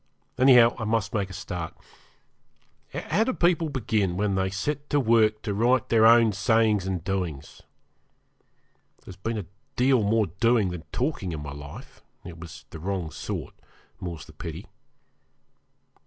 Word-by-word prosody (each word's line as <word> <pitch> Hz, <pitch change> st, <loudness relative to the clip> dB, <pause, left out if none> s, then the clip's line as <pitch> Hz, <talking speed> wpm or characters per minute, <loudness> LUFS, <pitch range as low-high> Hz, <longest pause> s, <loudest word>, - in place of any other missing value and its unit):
Anyhow, 125 Hz, -3 st, +7 dB
I -, -, -3 dB
must 110 Hz, -3 st, -1 dB
make 100 Hz, -3 st, -1 dB
a -, -, -9 dB
start. 90 Hz, -3 st, -6 dB, 1.2 s
How 220 Hz, -, 0 dB
do 260 Hz, -, -1 dB
people 170 Hz, -4 st, +2 dB
begin 105 Hz, -9 st, -1 dB
when 100 Hz, 0 st, 0 dB
they 95 Hz, 0 st, 0 dB
set 145 Hz, +10 st, -3 dB
to 145 Hz, -, +2 dB
work 110 Hz, -3 st, +3 dB
to 105 Hz, -, -2 dB
write 120 Hz, +4 st, +2 dB
their 110 Hz, -1 st, +6 dB
own 115 Hz, -1 st, +6 dB
sayings 105 Hz, -1 st, +2 dB
and 90 Hz, -4 st, -2 dB
doings? 90 Hz, -7 st, -4 dB, 1.4 s
There's 95 Hz, -, -10 dB
been 110 Hz, +5 st, -3 dB
a 105 Hz, -, -4 dB, 0.3 s
deal 130 Hz, -1 st, +3 dB
more 110 Hz, +1 st, +2 dB
doing 110 Hz, +3 st, +1 dB
than 85 Hz, -3 st, -7 dB
talking 125 Hz, -, -2 dB
in 75 Hz, -2 st, -5 dB
my 70 Hz, -, -6 dB
life 70 Hz, -1 st, -11 dB, 0.2 s
it 85 Hz, -1 st, -9 dB
was 85 Hz, 0 st, -10 dB
the 80 Hz, -, -8 dB
wrong 90 Hz, -2 st, -3 dB
sort -, -, -5 dB, 0.5 s
more's 85 Hz, -4 st, -6 dB
the -, -, -15 dB
pity. -, -, -7 dB
105 Hz, 155 wpm, -26 LUFS, 90-115 Hz, 1.4 s, Anyhow